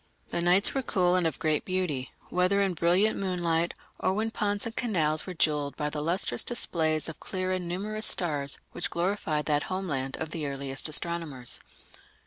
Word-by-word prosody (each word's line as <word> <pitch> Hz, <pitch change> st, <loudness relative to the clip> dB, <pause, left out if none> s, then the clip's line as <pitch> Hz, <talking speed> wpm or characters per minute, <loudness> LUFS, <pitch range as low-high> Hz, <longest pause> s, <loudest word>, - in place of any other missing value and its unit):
The 170 Hz, -, 0 dB
nights 180 Hz, +3 st, +4 dB
were 270 Hz, -, +1 dB
cool 180 Hz, -7 st, +2 dB
and 180 Hz, -2 st, +3 dB
of 160 Hz, -, -3 dB
great 155 Hz, -1 st, +1 dB
beauty, 180 Hz, -9 st, -1 dB, 0.2 s
whether 180 Hz, +3 st, +2 dB
in 195 Hz, -2 st, +2 dB
brilliant 175 Hz, +6 st, +3 dB
moonlight 175 Hz, -3 st, 0 dB, 0.2 s
or 190 Hz, -, +1 dB
when 220 Hz, +2 st, 0 dB
ponds 205 Hz, -2 st, -1 dB
and 230 Hz, 0 st, -5 dB
canals 160 Hz, -10 st, +1 dB
were 185 Hz, -, -5 dB
jewelled 150 Hz, -3 st, +1 dB
by 150 Hz, -1 st, -1 dB
the 150 Hz, -, -3 dB
lustrous 165 Hz, -6 st, +2 dB
displays 160 Hz, -9 st, 0 dB
of 160 Hz, -, -6 dB
clear 185 Hz, -1 st, -2 dB
and 185 Hz, -2 st, -1 dB
numerous 210 Hz, +5 st, -1 dB
stars 145 Hz, -5 st, +2 dB
which 175 Hz, -, -3 dB
glorified 170 Hz, -4 st, 0 dB
that 150 Hz, -1 st, +2 dB
homeland 145 Hz, -9 st, -2 dB
of 160 Hz, -1 st, -4 dB
the 155 Hz, -3 st, -2 dB
earliest 135 Hz, +1 st, -1 dB
astronomers. 155 Hz, -6 st, -2 dB
170 Hz, 175 wpm, -28 LUFS, 150-185 Hz, 0.2 s, nights